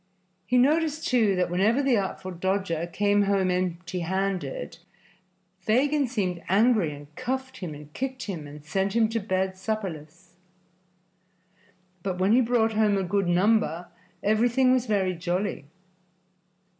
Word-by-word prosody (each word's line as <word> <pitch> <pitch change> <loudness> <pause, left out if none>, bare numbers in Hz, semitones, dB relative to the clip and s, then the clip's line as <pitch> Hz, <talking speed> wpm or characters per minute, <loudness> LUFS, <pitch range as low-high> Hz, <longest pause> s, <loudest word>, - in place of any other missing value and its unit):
He 250 - +2
noticed, 310 +4 +2
too, 225 -6 +3
that 180 -1 0
whenever 215 +10 +2
the 265 -3 +3
Artful 190 -2 -3
Dodger 180 -2 -1
came 205 +2 +2
home 195 -2 +2
empty 180 0 -2
handed 190 - -3 0.8
Fagin 270 +8 +2
seemed 190 -8 -2
angry 210 -4 +3
and 145 +1 -12
cuffed 260 0 -4
and 150 -4 -8
kicked 265 +3 -4
him 170 -8 -5
and 145 +1 -12
sent 195 +6 -1
him 225 -2 +3
to 230 0 -1
bed 190 -2 -1
supperless; 175 -4 -6 1.6
but 185 0 -3
when 190 +2 +2
he 250 - +5
brought 225 -2 +2
home 210 -2 +2
a 195 - 0
good 195 +1 0
number 180 -2 +2 0.3
everything 240 +5 +3
was 255 -1 +2
very 195 -4 +1
jolly. 180 -1 -2
195 Hz, 135 wpm, -26 LUFS, 180-230 Hz, 1.6 s, he